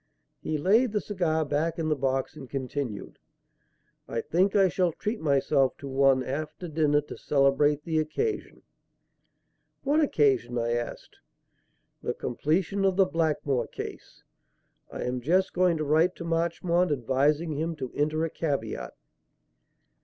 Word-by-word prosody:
He 155 - -2
laid 215 - +3
the 210 - +2
cigar 170 -7 -1
back 150 +3 -1
in 165 -2 -1
the 155 - +2
box 135 -1 -1
and 130 - -10
continued: 130 -4 -4 0.9
"I 115 - -2
think 185 - +1
I 195 -2 +6
shall 180 0 +1
treat 210 +7 -3
myself 140 -2 +2
to 140 - -8
one 135 -1 +3
after 155 +6 -5
dinner 150 -2 +2
to 150 - -9
celebrate 145 +1 +2
the 160 -1 0
occasion." 285 - -3 1.2
"What 290 +3 +2
occasion?" 135 - +2
I 120 0 0
asked. 120 0 -4 0.8
"The - - -3
completion 175 +10 -1
of 190 -1 +3
the 195 0 +5
Blackmore 150 -8 0
case. - - -9 0.7
I - - -5
am 125 0 -2
just 180 +8 +2
going 180 -2 +3
to 155 - -2
write 160 +5 +3
to - - -7
Marchmont 170 +1 +1
advising 145 +5 +1
him 160 +3 -2
to 130 -4 -6
enter 155 +2 0
a 165 - -5
caveat." 140 -9 -3
155 Hz, 145 wpm, -27 LUFS, 135-170 Hz, 1.2 s, I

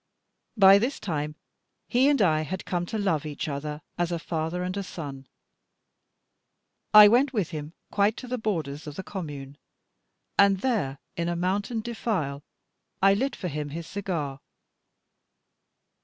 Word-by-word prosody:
By 195 0 +8
this 245 +6 -1
time 150 -4 -3 0.5
he 255 +3 +4
and 280 -7 +3
I 155 -4 +3
had 185 +4 -5
come 175 -1 -2
to 220 - -3
love 180 -8 +1
each 155 +2 -4
other, 150 +1 -4 0.2
as 175 0 +1
a 170 - 0
father 165 +1 -3
and 185 +1 -3
a 200 - -2
son. 140 -8 -7 1.6
I 210 0 +11
went 255 +5 +4
with 200 -7 -1
him 155 0 -6 0.2
quite 205 +2 +2
to 255 - -7
the 250 0 -3
borders 160 -9 -3
of 150 - -7
the 190 - -5
commune; 145 -8 -7 0.8
and 195 -1 +5
there, 210 - 0 0.2
in 170 0 -1
a 175 - -1
mountain 200 +6 -1
defile, 205 -12 -2 0.6
I 195 +1 +6
lit 265 +7 0
for 185 - -4
him 150 -2 -4
his 165 +3 -6
cigar. 165 -8 -3
175 Hz, 155 wpm, -27 LUFS, 150-205 Hz, 1.6 s, I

